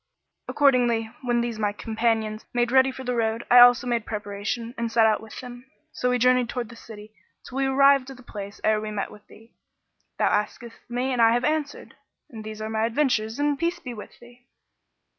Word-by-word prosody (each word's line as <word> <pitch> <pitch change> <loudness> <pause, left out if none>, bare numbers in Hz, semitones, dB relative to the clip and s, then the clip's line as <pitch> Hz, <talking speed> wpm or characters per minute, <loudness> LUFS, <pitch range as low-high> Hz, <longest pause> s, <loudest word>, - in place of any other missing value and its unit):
Accordingly, 240 -5 +2
when 240 -1 0
these 235 -2 -4
my 205 -1 0
companions 220 0 -1
made 240 0 +1
ready 265 0 +5
for 260 - -9
the 250 -1 -2
road, 225 -1 -1
I 245 - +9
also 245 +1 +7
made 240 -2 -1
preparation 210 +3 -4
and 235 -2 -3
set 225 -1 +4
out 220 -1 +2
with 220 -1 -10
them, 245 +1 -11 0.3
and 250 - +2
we 250 - +2
journeyed 250 0 +3
towards 240 -3 -4
this 230 - -14
city 215 -1 -12 0.3
till 255 - -8
we 270 - +1
arrived 275 0 +4
at 270 - -10
the 255 - -15
place 205 -3 -8
ere 215 0 +2
we 215 - -5
met 210 -2 -4
with 210 - -16
thee. 225 +1 -18 0.6
Thou - - +2
askedst 230 +3 -2
me 250 +2 -1
and 245 - +1
I 230 0 +5
have 245 +1 0
answered; 300 -1 -2 0.4
and 220 -3 -9
these 215 0 -7
are - - -3
my 220 0 0
adventures 230 -4 0
and 290 -1 0
peace 340 +1 -1
be 265 -8 -8
with 210 - -11
thee!" 245 +1 -18
235 Hz, 210 wpm, -24 LUFS, 220-250 Hz, 0.6 s, I